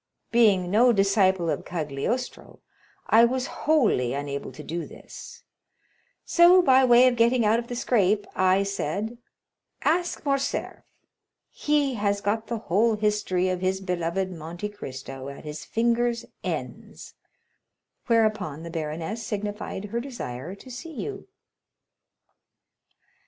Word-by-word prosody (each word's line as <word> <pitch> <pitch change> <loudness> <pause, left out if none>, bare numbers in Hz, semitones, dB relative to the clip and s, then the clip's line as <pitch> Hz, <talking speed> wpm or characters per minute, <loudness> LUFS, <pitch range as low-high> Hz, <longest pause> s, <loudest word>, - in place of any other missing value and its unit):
Being 200 -6 +3
no 240 +4 +5
disciple 195 -4 +2
of 145 - -3
Cagliostro, 165 - -4 0.5
I 225 +1 +6
was 255 +2 +1 0.2
wholly 205 - +3
unable 140 0 -4
to 155 - -10
do 170 +2 -4
this; - - -12 0.8
so, 355 +1 +6
by 265 -4 +5
way 245 0 +6
of 250 - +2
getting 235 0 +3
out 220 +2 +3
of 235 - -6
the 245 - -5
scrape, 210 -4 +1
I 185 +1 +3
said, 200 +4 -3 0.6
'Ask 345 0 0
Morcerf; 275 -1 -1 0.7
he 295 -2 +1
has 200 0 +1
got 215 +2 -2
the 235 - -2
whole 215 +3 +1
history 210 -3 0
of 180 -1 -2
his 190 0 0
beloved 180 0 -2
Monte 170 +4 -6
Cristo 135 -8 -8
at 140 - -10
his 150 0 -7
fingers' 235 +1 0 0.2
ends;' - - -6 0.9
whereupon 215 - +1
the 170 - -7
baroness 165 +7 -4
signified 210 -1 -4
her 225 +3 -3
desire 190 - -6
to 255 +6 -13
see 320 +7 -8
you." 400 - -6
210 Hz, 125 wpm, -25 LUFS, 175-240 Hz, 0.9 s, I